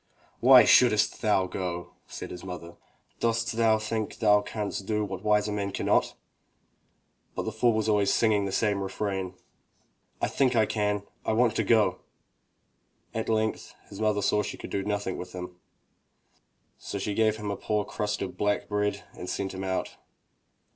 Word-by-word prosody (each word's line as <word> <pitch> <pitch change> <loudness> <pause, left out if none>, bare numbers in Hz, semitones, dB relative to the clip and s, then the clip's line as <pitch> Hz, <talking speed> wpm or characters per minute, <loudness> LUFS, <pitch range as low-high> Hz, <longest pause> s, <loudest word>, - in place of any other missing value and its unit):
"Why 125 -1 +8
shouldst 110 -3 +4
thou 105 -4 +3
go?'* 90 -2 -5
said - - -7
his 90 - -8
mother. 90 -2 -8 0.4
"Dost 115 0 0
thou 110 -1 +4
think 110 0 -3
thou 105 -2 +4
canst 105 -2 -4
do 105 -1 0
what 95 -2 -6
wiser 105 0 +2
men 100 -1 -2
cannot?" - - +1 1.2
But - - -2
the 110 - -3
fool 115 +2 +2
was 110 0 0
always 105 -2 +3
singing 105 -3 +2
the 100 - -3
same 100 -1 +1
refrain, 95 -1 -3 0.8
"I - - +1
think 130 -3 +1
I 110 -2 +4
can! 105 -1 -1 0.2
I - - 0
want 115 0 +3
to 110 - +2
go!" 105 -4 +3 1.1
At 110 0 -3
length 110 0 -1
his 100 - -8
mother 105 -2 +1
saw 105 +2 +2
she 105 - -5
could - - -9
do 100 - -1
nothing 100 -2 -2
with 90 0 -8
him, 90 -1 -7 1.2
so - - -5
she 100 +1 -2
gave 110 0 +2
him 105 -1 -4
a - - -2
poor 105 0 -1
crust 105 -2 -2
of 95 - -6
black 105 0 0
bread 105 0 -1
and 90 - -7
sent 95 -1 -3
him 95 0 -5
out. 95 -1 -3
105 Hz, 170 wpm, -27 LUFS, 95-110 Hz, 1.2 s, Why